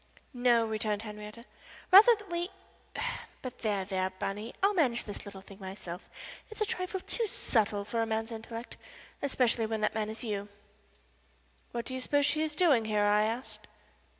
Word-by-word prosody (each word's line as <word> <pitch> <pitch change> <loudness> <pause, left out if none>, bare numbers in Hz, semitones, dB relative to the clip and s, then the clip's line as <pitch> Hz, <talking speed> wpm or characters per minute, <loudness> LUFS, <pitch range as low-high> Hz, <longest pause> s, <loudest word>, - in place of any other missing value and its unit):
"No," 245 -2 +4
returned 215 -1 -1
Henrietta, 210 +2 -8 0.5
"rather 435 +5 +10
that 415 -1 -13
we 345 +1 -1 0.9
but 255 - -6
there, 205 -4 0
there, 185 -1 0
Bunny, 195 +4 -4
I'll 400 +1 +5
manage 255 -10 +2
this 205 - -7
little 195 -1 -8
thing 195 +1 -14
myself. 190 -2 -7 0.4
It's 435 - -11
a 430 - +2
trifle 365 -1 -3
too 460 +3 -1
subtle 210 - +1
for 230 +2 -1
a 225 - 0
man's 225 +1 -1
intellect 230 +1 -7 0.4
especially 245 -5 +2
when 220 -1 -2
that 215 - +2
man 215 -1 -1
is 220 +3 -6
you." 205 -3 -3 1.2
"What 235 -1 -3
do 260 - -5
you 260 - -2
suppose 285 +2 +2
she 310 +1 +2
is 310 -1 -1
doing 295 -10 +4
here?" 210 -1 +2
I 205 0 +4
asked. 230 +4 -3
225 Hz, 175 wpm, -31 LUFS, 210-270 Hz, 1.2 s, rather